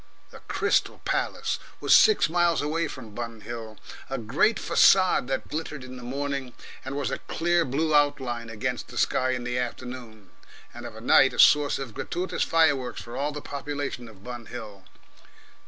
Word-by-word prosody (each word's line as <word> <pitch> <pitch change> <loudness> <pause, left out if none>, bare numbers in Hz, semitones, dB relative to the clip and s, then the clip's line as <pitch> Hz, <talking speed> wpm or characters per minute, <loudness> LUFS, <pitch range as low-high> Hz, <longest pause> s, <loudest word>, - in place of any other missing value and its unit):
The - - -12
Crystal - - +1
Palace - - -1 0.2
was - - +5
six 435 -1 +6
miles 170 0 +2
away 160 +3 -1
from 115 -5 -10
Bun 115 -1 -6
Hill, 115 -2 -7 0.3
a 135 - -2
great 135 - +2
facade 185 -9 +4
that 135 0 -2
glittered 150 -3 -5
in 130 0 -9
the 125 - -9
morning, 135 0 -4 0.3
and 135 +2 -5
was 145 - -2
a - - -3
clear 175 +1 +1
blue 155 +4 0
outline 130 -5 +1
against 110 -2 -3
the - - -10
sky 130 - +1
in 125 -1 -1
the 125 0 -2
afternoon, 120 -5 -7 0.4
and - - -8
of - - -11
a - - -10
night, - - +5
a - - -7
source 145 -1 +6
of 135 -5 -6
gratuitous 180 - -3
fireworks 145 -6 +2
for 120 - -9
all 145 +2 -1
the 150 0 -6
population 140 -3 -5
of 100 -3 -17
Bun 120 -1 -8
Hill. 100 -5 -9
130 Hz, 175 wpm, -26 LUFS, 120-150 Hz, 0.4 s, six